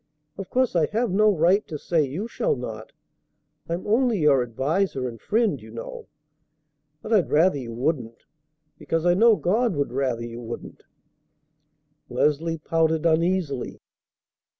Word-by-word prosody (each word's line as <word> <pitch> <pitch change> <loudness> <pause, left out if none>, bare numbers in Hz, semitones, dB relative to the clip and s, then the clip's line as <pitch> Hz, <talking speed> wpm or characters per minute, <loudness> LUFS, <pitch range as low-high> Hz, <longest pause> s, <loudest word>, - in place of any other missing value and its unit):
Of 195 -2 -7
course 255 -5 +1
I 160 -3 +3
have 230 0 -1
no 210 +3 +4
right 190 +2 +3
to 155 - -5
say 160 +1 +1
you 155 - -4
shall 465 - -1
not. - - -7 0.8
I'm 170 +2 -3
only 235 +1 +2
your 150 -6 +4
adviser 135 - -1
and 115 -2 -9
friend, 215 - 0
you 110 - -13
know. 115 +1 -8 1.0
But 225 - -2
I'd 200 -6 +3
rather 155 -1 +3
you 120 -3 -7
wouldn't, 120 -3 -2 0.5
because 165 +1 -2
I 175 - +5
know 225 +4 +5
God 215 +3 +1
would 140 -1 -1
rather 125 -3 -1
you 120 0 -8
wouldn't." 120 0 -8 1.3
Leslie 160 +3 0
pouted 160 0 0
uneasily. 165 -4 0
165 Hz, 145 wpm, -24 LUFS, 135-195 Hz, 1.3 s, I